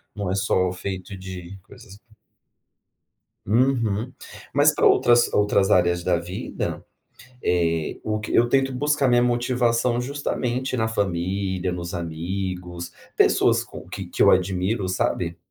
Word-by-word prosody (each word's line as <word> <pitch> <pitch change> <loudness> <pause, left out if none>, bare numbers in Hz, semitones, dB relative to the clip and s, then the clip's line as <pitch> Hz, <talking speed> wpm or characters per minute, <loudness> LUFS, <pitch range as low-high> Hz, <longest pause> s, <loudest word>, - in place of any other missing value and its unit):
não 100 -3 -3
é - - 0
só 95 -2 +1
feito 95 +1 -6
de 95 0 -8
coisas. 100 -2 -15 1.5
Uhum. 115 0 +1 0.4
Mas - - +5
para - - +2
outras 120 0 +5
outras 105 -1 +2
áreas 85 -1 +3
da 90 -2 +1
vida, 90 +2 -5 0.6
eh, 85 -2 0
o 110 0 -1
que 105 - -6
eu 120 +1 +4
tento 135 0 +2
buscar 145 +2 +1
minha 120 0 +4
motivação 120 0 +1
justamente 130 -1 -2
na 110 -1 0
família, 95 -2 -1
nos 85 0 -5
amigos, 90 +1 -4 0.3
pessoas - - +4
com - - -11
que - - -6
que - - 0
eu - - +7
admiro, 95 +2 +1
sabe? 85 -2 -1
100 Hz, 130 wpm, -23 LUFS, 90-120 Hz, 1.5 s, eu